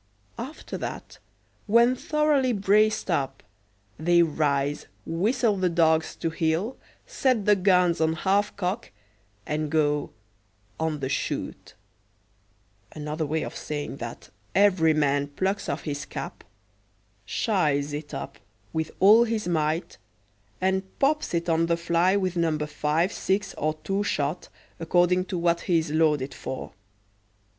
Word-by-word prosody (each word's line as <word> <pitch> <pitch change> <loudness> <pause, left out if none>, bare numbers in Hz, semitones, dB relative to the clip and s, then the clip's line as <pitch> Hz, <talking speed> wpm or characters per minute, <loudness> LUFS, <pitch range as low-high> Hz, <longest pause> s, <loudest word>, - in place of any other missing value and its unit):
After 265 +7 -6
that, - - -7 0.5
when 235 +4 +5
thoroughly 295 -3 +1
braced 210 0 +2
up, 140 -5 -1 0.6
they 170 +2 +4
rise, 145 -2 0 0.2
whistle 210 +6 +1
the 185 -1 +1
dogs 160 -1 +2
to 165 - -2
heel, 165 +9 0 0.3
set 250 -6 0
the 210 - +5
guns 180 -3 +3
on 160 0 +2
half 200 +5 +1
cock, 195 +4 -2 0.6
and 150 0 -2
go 150 -1 +1 0.7
"on 160 -2 -1
the 130 - -1
shoot" 135 - -4 1.2
another 150 +1 -3
way 160 +2 -1
of - - -6
saying 145 -2 -5
that 120 -2 -8 0.2
every 185 -6 +4
man 145 -1 +1
plucks 190 +7 -2
off 140 - -3
his 145 -1 -4
cap, - - -7 0.8
"shies" 150 -9 0
it 145 0 -6
up 135 - -6 0.3
with 160 0 -1
all 215 +5 +7
his 220 -4 -2
might, 160 0 -1 0.6
and 190 +1 +1 0.2
pops 300 +2 +1
it 170 0 -1
on 165 0 +2
the 170 0 +1
fly 170 +3 +2
with 185 -3 0
No. 165 -3 +1
5, 150 +3 0
6, 195 +2 -1
or 155 +1 -1
2 195 +1 0
shot, 155 -3 -2 0.3
according 175 +2 +2
to 185 -1 -4
what 170 0 +1
he 175 - +2
is 160 -2 -1
loaded 150 -4 +2
for. 130 - -6
170 Hz, 135 wpm, -26 LUFS, 150-195 Hz, 1.2 s, all